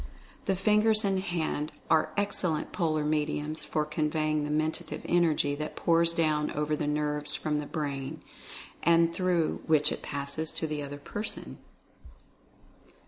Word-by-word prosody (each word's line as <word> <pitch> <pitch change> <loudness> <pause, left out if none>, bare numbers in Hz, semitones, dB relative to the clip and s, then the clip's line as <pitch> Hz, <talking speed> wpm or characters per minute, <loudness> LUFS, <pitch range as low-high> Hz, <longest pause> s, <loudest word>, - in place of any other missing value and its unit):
The 195 - +2
fingers 210 +2 +3
and 195 -1 +2
hand 160 -4 -2 0.2
are 160 -1 +3
excellent 185 -6 0
polar 155 -4 0
mediums 150 0 -1
for 150 0 -1
conveying 155 0 0
the - - -4
Mentative 155 +1 -1
Energy 165 -4 +2
that 150 +1 -4
pours 170 0 +3
down 155 -2 +2
over 150 +1 0
the 150 -1 -2
nerves 150 0 +1
from 150 -1 -1
the 150 - -5
Brain, 140 -4 -4 0.6
and 170 0 +4
through 175 -3 +1
which 150 -2 +4
it - - -4
passes 140 +2 -3
to - - -1
the 150 -1 -3
other 145 0 -6
person. 205 +9 -5
155 Hz, 140 wpm, -29 LUFS, 150-170 Hz, 0.6 s, and